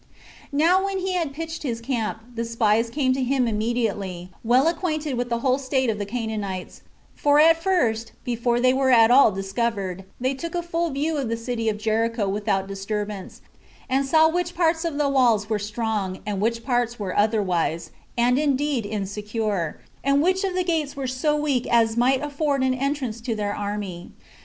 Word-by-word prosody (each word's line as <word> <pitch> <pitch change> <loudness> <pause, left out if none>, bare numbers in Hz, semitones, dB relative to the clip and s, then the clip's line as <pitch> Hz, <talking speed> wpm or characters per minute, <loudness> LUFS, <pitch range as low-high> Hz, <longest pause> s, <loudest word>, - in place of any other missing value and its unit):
2. 280 - -4
Now 355 +5 +4
when 390 0 -1
he 375 0 -2
had 335 -5 -1
pitched 325 +3 -6
his 240 -6 -3
camp, 230 -3 -2
the 230 0 -2
spies 230 -1 +1
came 260 0 +1
to 265 - -2
him 255 -1 +1
immediately, 210 -5 -2
well 250 +6 +4
acquainted 315 -4 -1
with 245 0 -2
the 235 -1 -1
whole 260 +1 +2
state 260 -2 0
of 210 - -5
the 205 - -3
Canaanites; 210 -5 -4 0.3
for 290 0 +3
at 325 +1 +6
first, 230 - +1
before 240 0 0
they 255 +1 +4
were 265 0 +2
at 230 -2 +6
all 260 -3 +7
discovered, 195 -1 -2
they 260 +2 0
took 335 +6 -6
a 345 - -1
full 340 0 -1
view 300 +3 -1
of 265 -5 -2
the 230 - -1
city 230 -1 -2
of 210 - -2
Jericho 225 0 0
without 195 -1 -1
disturbance, 200 0 -5 0.5
and 270 +1 +1
saw 315 +4 +5
which 350 +1 -1
parts 325 -1 +2
of 320 -4 -2
the 295 -1 +2
walls 235 -6 +2
were 215 - +1
strong, 210 -2 -3
and 205 -2 -2
which 230 +2 0
parts 240 -2 0
were 195 -4 -4
otherwise, 195 -6 +1 0.3
and 245 +2 +3
indeed 280 -5 0
insecure, 205 -3 -3 0.2
and 275 +1 +3
which 375 +3 +2
of 380 -2 -1
the 365 - +1
gates 315 -5 -1
were 275 -1 -4
so 260 +4 0
weak 285 -5 0
as 225 -1 +3
might 260 +3 +2
afford 285 -2 0
an 260 0 +2
entrance 260 -4 -2
to 230 -1 -2
their 205 -1 -2
army. 205 -4 -5
240 Hz, 190 wpm, -24 LUFS, 215-285 Hz, 0.5 s, all